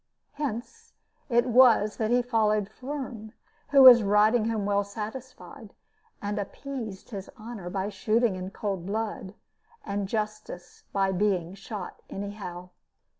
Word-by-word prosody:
Hence 295 - -6 0.4
it 240 -1 +3
was 240 -4 +5
that 220 -1 0
he 245 +1 +3
followed 215 -4 +1
Firm, 255 -6 -7 0.4
who 275 -1 +7
was 245 -2 +11
riding 215 +3 +3
home 215 -3 -1
well 200 0 +2
satisfied, 220 +1 -9 0.5
and 205 +1 -2
appeased 225 -1 -6
his 195 -3 -6
honor 215 -5 -7
by 190 +2 -2
shooting 215 +2 +1
in 185 0 -5
cold 195 -3 -4
blood, 210 -2 -4 0.5
and 200 -1 -2
justice 215 -5 -5
by 195 -1 +1
being 185 -2 0
shot 200 0 -8
anyhow. 195 -3 -7
210 Hz, 125 wpm, -27 LUFS, 195-235 Hz, 0.5 s, was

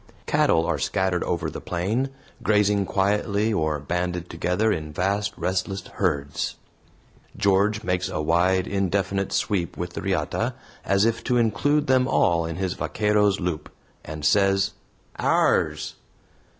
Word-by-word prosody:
Cattle 80 - +3
are - - -1
scattered 95 -2 0
over 85 -2 -1
the - - -7
plain, 105 +10 -1 0.3
grazing 105 -2 +2
quietly 105 +2 +1
or 80 -4 0
banded 90 +4 -3
together 90 +6 +1
in 80 -5 -3
vast 100 +6 0
restless 95 +1 -2
herds. 75 -7 -2 0.8
George 100 +2 +2
makes 90 0 -1
a - - -3
wide, 90 +4 +2
indefinite 100 0 -1
sweep 90 -4 -1
with 90 0 -4
the - - -5
riata, 95 -6 -1 0.3
as 100 +2 +2
if 115 0 0
to 125 - +2
include 120 +7 +2
them 130 -1 +3
all 85 -9 +2
in 80 - -4
his 95 0 -2
vaquero's 105 -2 +1
loop, 85 -4 -3 0.3
and 75 0 -6
says, 100 -1 +3 0.5
"Ours!" 75 0 +1
95 Hz, 135 wpm, -24 LUFS, 85-105 Hz, 0.8 s, Cattle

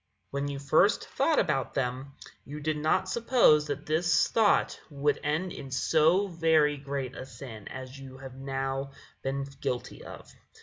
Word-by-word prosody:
When 140 +1 -2
you 140 -1 -4
first 155 +9 +3
thought 305 +3 +1
about 135 -4 0
them, 130 +1 -2 0.3
you 145 +2 -8
did 155 +1 -1
not 155 +5 +1
suppose 225 -9 +4
that 145 0 -4
this 170 +2 +2
thought 220 -3 +3
would 145 0 0
end 155 +5 -1
in 135 - -8
so 160 +8 +3
very 160 -4 +3
great 135 -2 -5
a - - -6
sin 115 -4 -10
as 130 +1 -8
you 130 -1 -10
have 135 -1 -9
now 135 +1 -3 0.3
been 135 +1 -2 0.2
guilty 125 -1 -4
of." - - -11
140 Hz, 160 wpm, -29 LUFS, 135-155 Hz, 0.3 s, suppose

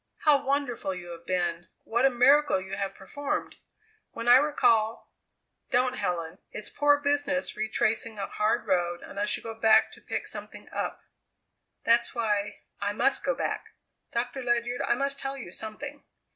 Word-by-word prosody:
"How 295 -3 +4
wonderful 265 -8 -1
you 175 -1 -8
have 170 0 -10
been; 175 -2 -1 0.2
what 235 +3 +1
a - - +7
miracle 270 -1 +5
you 190 +1 -6
have 195 -1 -3
performed. 280 +9 -4 0.6
When 230 +1 -5
I 245 +1 +9
recall 230 -6 +2 0.3
" - - -52
"Don't, 255 0 +2
Helen! 175 -6 -3
It's 210 - -6
poor 290 0 +4
business 285 -1 0
retracing 220 +1 -1
a 200 - -2
hard 210 +2 0
road 175 -1 0
unless 205 +1 -2
you - - -12
go 225 - -5
back 220 0 +4
to - - -15
pick - - -3
something - - -8
up." - - -3 0.8
"That's 235 +1 +3
why 205 -3 -1 0.2
I 205 0 -1
must 270 - +2
go - - +1
back. - - -3 0.4
Doctor 245 +3 -2
Ledyard, 240 0 0
I - - +2
must 275 +2 -1
tell 270 0 -3
you 240 -10 -8
something! 275 +9 -7
230 Hz, 165 wpm, -28 LUFS, 200-275 Hz, 0.8 s, I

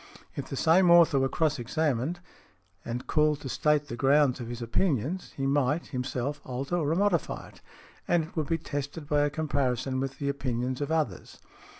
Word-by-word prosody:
If 140 - -5
the - - -4
same 170 +5 +4
author 170 -5 +6
were 135 0 +1
cross 155 -3 0
examined, 145 +5 -1 0.6
and 120 +1 -4
|102| - - -30
called 150 -1 +2
to 135 - -6
state 150 +2 +1
the 120 - -5
grounds 135 +1 +3
of 120 - -6
his 120 0 -6
opinions, 140 - -1
he 135 - -1
might, 145 +3 +1
himself, 130 +3 -3
alter 135 +7 -3
or 160 -1 +1
modify 195 -3 0
it, - - -19 0.5
and 175 -2 +3
it 160 - -12
would 155 -4 -1
be 165 - +1
tested 145 -1 -5
by 150 -1 +2
a - - +1
comparison 135 -4 -1
with 135 0 -3
the 140 - -3
opinions 130 -1 -2
of 145 +2 -2
others. 155 - -2
145 Hz, 190 wpm, -28 LUFS, 130-160 Hz, 0.6 s, author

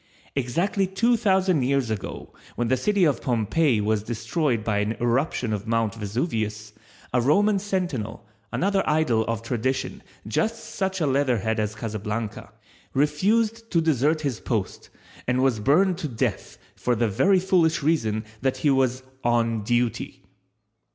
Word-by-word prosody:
Exactly 170 +10 0
two 230 +6 +2
thousand 190 - +2
years 130 -2 +1
ago 105 -3 -5 0.2
when 120 -1 -1
the 130 - +4
city 200 +9 +1
of 145 -7 +2
Pompeii 120 +2 +1
was 105 0 +1
destroyed 120 +2 -1
by 105 -2 0
an 105 +2 0
eruption 120 -1 0
of 105 +1 -4
Mount 115 -2 +1
Vesuvius, 110 - -3 0.4
a 125 - +3
Roman 200 - +3
sentinel, 175 - -3 0.3
another 195 +1 +1
idol 150 -8 +2
of 115 -1 -2
tradition 125 +2 -2 0.3
just 220 - -2
such 190 -2 -2
a - - +3
leatherhead 125 -6 +1
as 105 0 -1
Casablanca, 110 0 -4 0.4
refused 215 +11 +1
to 170 - +2
desert 155 0 +2
his 135 -6 -2
post 110 -6 -3 0.4
and 125 +1 +2
was 130 -5 +2
burned 170 - +3
to 155 - -2
death 115 -5 -3 0.2
for 125 - 0
the 115 +1 +1
very 185 - +3
foolish 175 -5 +2
reason 115 -9 +1 0.2
that 130 0 0
he 145 - +2
was 130 -1 +1 0.2
"on 115 -2 +1
duty." 120 +1 -1
130 Hz, 145 wpm, -25 LUFS, 110-165 Hz, 0.4 s, the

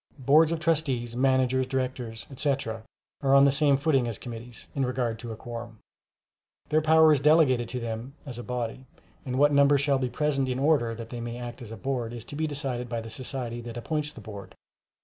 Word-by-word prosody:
Boards 150 +4 +5
of 165 - -1
Trustees, 145 -8 0
Managers, 130 0 +2
Directors, 125 -3 -3
etc., 135 -5 -1 0.4
are 135 -1 +4
on 140 0 +7
the 140 - +5
same 140 0 +4
footing 140 -4 +2
as 115 -4 -4
committees, 120 0 -9
in 135 - 0
regard 125 -3 -1
to 115 -1 -6
a - - -5
quorum. 115 0 -8 0.9
Their 155 +1 +3
power 160 0 +6
is 145 - +2
delegated 140 -5 +4
to 125 - -3
them 115 +3 -5
as 125 -4 -7
a - - -6
body, 125 +1 -4 0.4
and 125 0 -2
what 145 +1 +4
number 140 0 +5
shall 140 -1 +2
be 130 -1 -1
present 140 -1 0
in 125 - -1
order 135 -5 +2
that 115 0 -8
they 120 -1 -5
may 120 0 -5
act 120 +1 -7
as 115 -3 -9
a 115 - -7
Board, 120 -1 -3
is 120 -2 -7
to - - -9
be 155 +1 -1
decided 135 -4 -3
by 115 -1 -2
the 115 0 -8
society 120 -1 -4
that 120 0 -7
appoints 150 +4 -2
the 135 - -12
Board. 100 -2 -9
130 Hz, 210 wpm, -27 LUFS, 120-140 Hz, 0.9 s, on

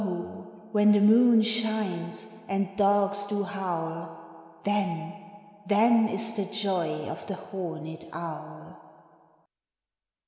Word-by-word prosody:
0, 180 +2 -7
when 210 -1 +5
the 205 - +5
moon 225 +2 +6
shines, 215 -3 -2
and 195 0 -1
dogs 200 0 +2
do 205 0 -1
howl, 165 -3 -6
Then, 195 -5 -1 0.5
then, 225 +2 +5
is 225 +2 -1
the 200 -2 -1
joy 200 -4 -2
of - - -7
the 195 - -3
horned 165 -4 -7
owl! 75 - -8
200 Hz, 105 wpm, -27 LUFS, 170-210 Hz, 0.5 s, moon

